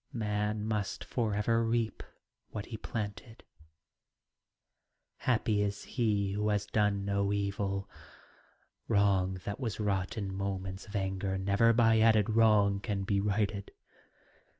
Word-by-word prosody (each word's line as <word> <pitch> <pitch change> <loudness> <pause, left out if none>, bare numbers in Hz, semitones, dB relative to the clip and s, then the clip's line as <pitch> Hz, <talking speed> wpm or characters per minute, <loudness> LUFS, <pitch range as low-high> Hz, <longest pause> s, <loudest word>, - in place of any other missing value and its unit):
Man 105 -1 -1
must 105 -3 -2
for 110 -4 -1
ever 115 +2 +2
reap 115 0 0 0.5
what 105 -1 -5
he 115 - -7
planted: 110 +1 -6 1.7
Happy 110 -4 +1
is 100 0 -2
he 105 -6 0
who 105 +2 0
has 105 -1 +1
done 105 -2 +1
no 100 0 0
evil. 100 -1 -1 1.0
Wrong 95 -2 +2
that 100 - -4
was 115 -6 -3
wrought 100 -2 -1
in 100 -3 -3
moments 95 0 -4
of 105 - -9
anger 95 0 -1
Never 100 +4 +3
by 115 -1 +4
added 110 -1 +4
wrong 105 -3 +4
can 100 -1 -2
be 100 0 +1
righted. 100 -1 -1
105 Hz, 125 wpm, -31 LUFS, 100-110 Hz, 1.7 s, by